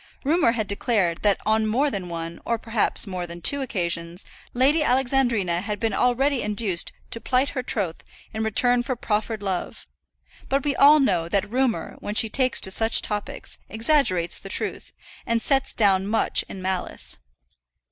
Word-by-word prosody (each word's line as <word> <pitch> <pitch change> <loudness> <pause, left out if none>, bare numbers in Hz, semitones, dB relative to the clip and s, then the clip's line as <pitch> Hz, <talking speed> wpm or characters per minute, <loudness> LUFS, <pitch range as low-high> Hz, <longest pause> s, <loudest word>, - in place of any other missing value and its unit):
Rumour 295 -4 +3
had 220 -3 -1
declared 200 -4 0
that 205 -2 +2
on 220 0 +2
more 270 +7 +1
than 185 -5 -5
one, 165 0 -6
or 235 - -1
perhaps 225 -1 0
more 180 -2 -5
than 170 0 -8
two 280 +11 +1
occasions, 170 -6 -2 0.3
Lady 275 +6 +3
Alexandrina 245 - +1
had 205 0 -4
been 225 -2 -1
already 250 +4 +1
induced 205 -4 -1 0.2
to 230 - -4
plight 260 +2 +1
her 260 - -3
troth 200 -9 -2 0.3
in 220 0 -2
return 245 +3 +3
for 255 +1 -3
proffered 215 -2 -2
love; 190 -3 -4 0.6
but 275 +1 0
we 285 - 0
all 295 +2 +7
know 175 - +1
that 195 +2 0
Rumour, 250 +1 -1
when 205 - -5
she 225 - +4
takes 255 +1 +2
to 190 - +3
such 225 +3 +3
topics, 210 -1 -4
exaggerates 220 - +1
the 195 - -10
truth, - - -1 0.3
and 230 0 0
sets 270 +3 0
down 195 -3 +2
much 220 +2 +1
in 190 - -8
malice. 185 -1 -4
220 Hz, 165 wpm, -24 LUFS, 190-255 Hz, 0.6 s, all